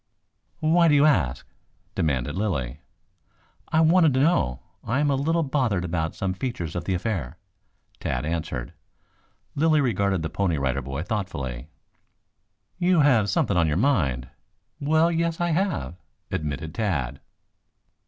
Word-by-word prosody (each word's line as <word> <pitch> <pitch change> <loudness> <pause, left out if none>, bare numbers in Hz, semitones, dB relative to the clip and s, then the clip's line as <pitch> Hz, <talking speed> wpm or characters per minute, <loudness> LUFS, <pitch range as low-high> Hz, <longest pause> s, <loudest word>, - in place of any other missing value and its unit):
"Why 165 +2 +4
do 150 - +5
you 145 +1 +5
ask?" 85 - +2 0.5
demanded 75 -2 -1
Lilly. 75 - -2 0.9
"I 160 - +2
wanted 160 -3 +5
to - - +3
know. 65 - +1 0.2
I 125 +5 0
am 145 -1 +2
a - - +2
little 165 +5 +1
bothered 125 - 0
about 80 -2 -2
some 95 -1 -2
features 95 - -4
of 85 - -3
the 95 - 0
affair," 90 - -3 0.6
Tad 60 +3 -2
answered. 80 -6 -3 0.8
Lilly 155 +1 +3
regarded 100 - +1
the 80 - -2
Pony 90 -6 0
Rider 70 -1 -1
Boy 70 +4 -4
thoughtfully. 75 - -4 1.1
"You 180 -2 +4
have 120 -8 +4
something 95 0 +1
on 85 -2 +3
your 75 +1 0
mind?" 75 - +1 0.5
"Well, 160 +3 +3
yes, 165 0 -1
I 175 0 +1
have," 160 - -1 0.3
admitted 75 +1 -3
Tad. 70 - -2
95 Hz, 140 wpm, -25 LUFS, -, 1.1 s, do